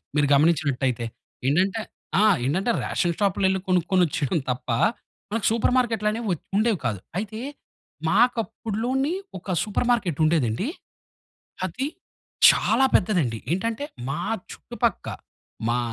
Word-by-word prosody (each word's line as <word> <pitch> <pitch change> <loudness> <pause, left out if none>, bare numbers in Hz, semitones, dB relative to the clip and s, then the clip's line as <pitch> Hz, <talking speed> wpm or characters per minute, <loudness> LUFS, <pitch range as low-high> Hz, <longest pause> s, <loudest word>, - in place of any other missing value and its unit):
మీరు 145 -1 +3
గమనించినట్టయితే. 140 -5 +2 0.4
ఏంటంటే 190 +9 +2 0.4
ఆ! - - +5 0.2
ఏంటంటే 185 - +1
రేషన్ 175 -2 0
షాప్‌లో 200 -1 +1
యెళ్లి 190 0 +1
కొనుక్కొనిచ్చడం 175 -3 +2
తప్ప 125 +1 -6 0.6
మనకు 220 -1 -1
సూపర్ 230 +2 +2
మార్కెట్లనేవి 225 -2 0
వ - - +3 0.2
ఉండేవి 215 -3 +2
కాదు 105 -5 -1 0.2
అయితే 215 +2 -4 0.7
మాకు 240 +8 +4
అప్పుడులోని 245 +9 -2 0.3
ఒక 185 +1 -4
సూపర్ 215 +3 -1
మార్కెట్ 185 - 0
ఉండేదండి. 155 - +1 1.0
అది 250 +10 -3 0.6
చాలా 265 - +3
పెద్దదండి. 165 - +2
ఏంటంటే 225 +8 -1 0.2
మా 140 - -2 0.3
చుట్టుపక్క - - -2 0.6
మా 120 +1 +2
190 Hz, 115 wpm, -24 LUFS, 150-225 Hz, 1.0 s, ఆ